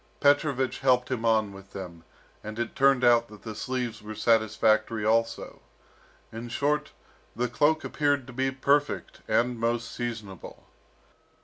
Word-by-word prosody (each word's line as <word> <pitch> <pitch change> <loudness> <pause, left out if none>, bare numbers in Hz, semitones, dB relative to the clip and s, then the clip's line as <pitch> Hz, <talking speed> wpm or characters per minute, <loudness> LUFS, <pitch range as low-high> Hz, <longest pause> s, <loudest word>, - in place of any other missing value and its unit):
Petrovich 145 -2 +2
helped 130 -1 +2
him 115 -3 -2
on 110 -3 +2
with 95 0 -14
them, 90 -4 -8 0.4
and 110 +1 -7
it 120 -1 -3
turned 135 -2 +4
out 120 -1 +5
that 105 -1 -15
the 110 - -6
sleeves 120 0 -4
were 105 +1 -8
satisfactory 110 0 +2
also. 115 +1 0 0.7
In 115 +2 -7
short, 145 +4 0 0.4
the 125 +2 0
cloak 150 +5 +2
appeared 145 -3 0
to 125 - -11
be 130 +2 0
perfect, 140 +2 0
and 120 0 +1
most 115 0 -1
seasonable. 110 -6 -7
120 Hz, 140 wpm, -27 LUFS, 110-130 Hz, 0.7 s, out